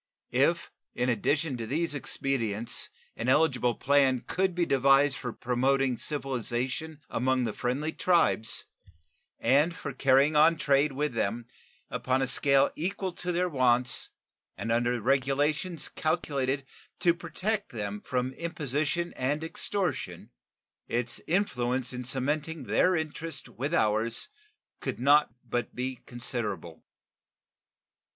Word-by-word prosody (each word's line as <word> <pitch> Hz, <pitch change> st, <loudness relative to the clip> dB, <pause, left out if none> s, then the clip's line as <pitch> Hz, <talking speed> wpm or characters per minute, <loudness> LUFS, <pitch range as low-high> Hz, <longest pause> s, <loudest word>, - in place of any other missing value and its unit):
If -, -, +2 dB, 0.2 s
in 125 Hz, +1 st, 0 dB
addition 135 Hz, +5 st, 0 dB
to 115 Hz, -1 st, -5 dB
these 155 Hz, +5 st, 0 dB
expedients 120 Hz, -6 st, -1 dB, 0.3 s
an 115 Hz, -, -2 dB
eligible 130 Hz, -5 st, +3 dB
plan 135 Hz, -3 st, +3 dB
could 190 Hz, -1 st, 0 dB
be 175 Hz, -1 st, +2 dB
devised 135 Hz, 0 st, +4 dB
for 125 Hz, -2 st, -4 dB
promoting 130 Hz, +2 st, +1 dB
civilization 135 Hz, +3 st, -2 dB
among 130 Hz, +1 st, +1 dB
the 110 Hz, -3 st, -2 dB
friendly 135 Hz, +6 st, -1 dB
tribes 115 Hz, -, +2 dB, 0.7 s
and 150 Hz, +6 st, +3 dB
for 140 Hz, -, -6 dB
carrying 135 Hz, +3 st, +4 dB
on 160 Hz, +3 st, +6 dB
trade 140 Hz, 0 st, +2 dB
with 145 Hz, 0 st, -1 dB
them 115 Hz, +1 st, -1 dB, 0.5 s
upon 130 Hz, +1 st, 0 dB
a -, -, +2 dB
scale 140 Hz, +1 st, +3 dB
equal 190 Hz, +3 st, -2 dB
to 180 Hz, 0 st, -3 dB
their 180 Hz, +1 st, +1 dB
wants 125 Hz, -5 st, +2 dB, 0.5 s
and 115 Hz, -, -3 dB
under 120 Hz, +1 st, +1 dB
regulations 140 Hz, -, 0 dB
calculated 140 Hz, -4 st, -1 dB, 0.4 s
to 170 Hz, -, +5 dB
protect 185 Hz, +5 st, -3 dB
them 105 Hz, -2 st, -4 dB
from 125 Hz, 0 st, -1 dB
imposition 155 Hz, +1 st, -2 dB
and 145 Hz, +4 st, -1 dB
extortion, 185 Hz, +3 st, -3 dB, 0.6 s
its 120 Hz, 0 st, -2 dB
influence 130 Hz, -9 st, 0 dB
in 125 Hz, 0 st, -4 dB
cementing 145 Hz, +5 st, -2 dB
their 185 Hz, 0 st, +3 dB
interest 160 Hz, -1 st, -4 dB
with 140 Hz, +5 st, -4 dB
ours 110 Hz, -6 st, +1 dB, 0.5 s
could -, -, -4 dB
not 145 Hz, +1 st, +5 dB, 0.2 s
but 120 Hz, +1 st, -2 dB
be 130 Hz, +1 st, -3 dB
considerable. 110 Hz, -9 st, -5 dB
135 Hz, 120 wpm, -29 LUFS, 125-155 Hz, 0.7 s, on